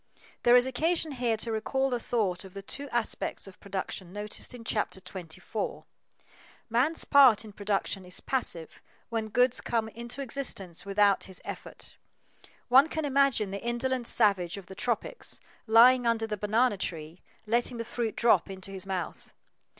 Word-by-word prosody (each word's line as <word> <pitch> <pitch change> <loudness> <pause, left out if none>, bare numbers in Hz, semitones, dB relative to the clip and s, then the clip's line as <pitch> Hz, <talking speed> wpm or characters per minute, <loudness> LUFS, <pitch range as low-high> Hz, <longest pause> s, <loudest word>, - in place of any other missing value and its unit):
There 240 0 +6
is 250 0 +6
occasion 315 +5 0
here 240 -4 0
to 225 +1 -4
recall 265 +5 0
the 245 - 0
thought 205 -7 -1
of 190 0 -12
the 195 - -6
two 280 +7 -6
aspects 240 -2 -2
of 195 -2 -11
production 190 -2 -5
noticed 210 +2 -5
in 235 - -10
Chapter 210 -4 -1
24. 180 -3 -6 0.9
Man's 270 +8 +2
part 260 -6 +6
in 210 - -11
production 200 -1 -2
is 180 0 -4
passive 170 -11 -3 0.3
when 225 -2 -2
goods 245 +3 +3
come 225 -2 -1
into 235 +4 -6
existence 200 -10 -4
without 200 0 +3
his 190 -1 -6
effort. - - -7 0.7
One 265 +4 +7
can 315 -1 -2
imagine 275 -7 +2
the 200 - -4
indolent 240 +1 -1
savage 195 -5 +3
of 195 - -9
the 190 - -10
tropics, 240 - -3 0.3
lying 240 +2 +7
under 225 -1 +1
the 215 -1 -3
banana 210 +2 +2
tree, 165 -2 -5 0.2
letting 235 +2 +1
the 230 - -4
fruit 230 -1 -3
drop 235 -3 +3
into 190 0 -8
his 195 -1 -5
mouth. 185 -4 -5
225 Hz, 160 wpm, -29 LUFS, 195-245 Hz, 0.9 s, One